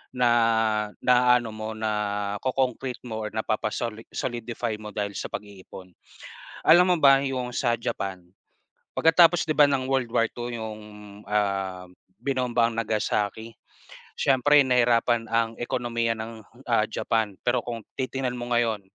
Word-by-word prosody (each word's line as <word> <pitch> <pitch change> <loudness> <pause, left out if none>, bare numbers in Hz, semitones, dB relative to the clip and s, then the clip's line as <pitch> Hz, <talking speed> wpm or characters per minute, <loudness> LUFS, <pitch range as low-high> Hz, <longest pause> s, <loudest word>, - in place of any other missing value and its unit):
Na 115 -3 +2
na, 125 0 +5
ano 115 -2 -6
mo 110 0 -5
na-ko-concrete 110 +4 -2
mo 110 -1 -4
or 105 - -5
napapa-soli-solidify 115 +1 -3
mo 105 -1 -8
dahil 100 -1 -4
sa - - -5
pag-iipon. 95 -3 -10 0.7
Alam 175 +2 +8
mo - - -3
ba 135 -2 +6
'yong 130 -2 -3
sa 120 -2 +1
Japan, 100 -5 -4 0.8
pagkatapos 170 +1 +5
'di 155 - 0
ba 150 - +8
ng 135 -2 0
World 130 -3 0
War 115 - +3
II 120 0 -6
'yong 110 -1 -6 0.5
ah, 95 -3 -1 0.4
binombang 125 -3 0
Nagasaki, 110 0 -1 0.7
siyempre 140 +2 +4
nahirapan 120 -1 +3
ang 115 0 +1
ekonomiya 120 -1 -1
ng, 110 0 -7 0.2
ah, 115 -3 +3
Japan. 110 -2 -1 0.2
Pero 120 +1 +3
kung 120 -1 -5 0.2
titingnan 130 -1 -2
mo 120 0 -6
ngayon, 115 -4 +1
115 Hz, 130 wpm, -25 LUFS, 110-125 Hz, 0.8 s, Alam